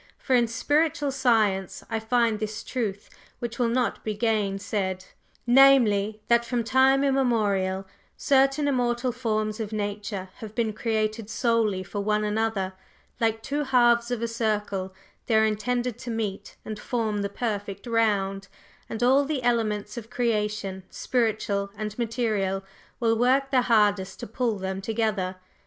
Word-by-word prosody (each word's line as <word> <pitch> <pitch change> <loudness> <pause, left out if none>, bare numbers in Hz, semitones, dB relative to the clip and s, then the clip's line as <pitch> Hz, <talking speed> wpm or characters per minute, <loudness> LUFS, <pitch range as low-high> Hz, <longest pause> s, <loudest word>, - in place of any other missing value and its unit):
For 260 - +1
in 240 -1 +4
spiritual 290 +5 +1
science 220 -8 +1
I 225 -1 -2
find 225 -1 +1
this 215 0 -4
truth, 210 -6 -3 0.3
which 235 0 -5
will 240 -1 +2
not 245 0 0
be 215 -1 -2
gainsaid 200 -3 -1 0.4
namely, 230 -5 +5
that 235 0 +4
from 235 0 -1
time 265 +3 +4
immemorial, 210 -8 +1 0.3
certain 275 +1 +3
immortal 245 -2 +1
forms 215 -3 -2
of 220 -1 -4
Nature 205 -2 -4
have 220 -1 -9
been 225 -3 0
created 215 -1 -1
solely 220 -4 +1
for 205 +2 -5
one 210 +1 +1
another; 210 -3 -1 0.5
like 225 -1 0
two 290 +1 -1
halves 240 -3 +3
of 240 -2 -2
a - - +1
circle, 210 -4 -2 0.4
they 225 - +2
are 220 0 +5
intended 240 +2 -1
to 245 - -7
meet 215 -4 -4
and 215 -1 -5
form 220 -4 -1
the 200 - -2
perfect 205 -3 -4
round, 200 -4 0 0.4
and 225 +2 -3
all 265 +3 +5
the 280 -3 -2
elements 220 -2 0
of 225 -1 -7
creation, 210 -5 -1
spiritual 215 -4 -1
and 215 -1 -4
material, 215 -5 -1 0.4
will 225 -1 +2
work 260 +4 +2
their 255 -2 +4
hardest 205 -5 +2
to - - -4
pull 230 0 -1
them 190 0 -4
together. 210 -3 -1
220 Hz, 145 wpm, -26 LUFS, 205-240 Hz, 0.5 s, namely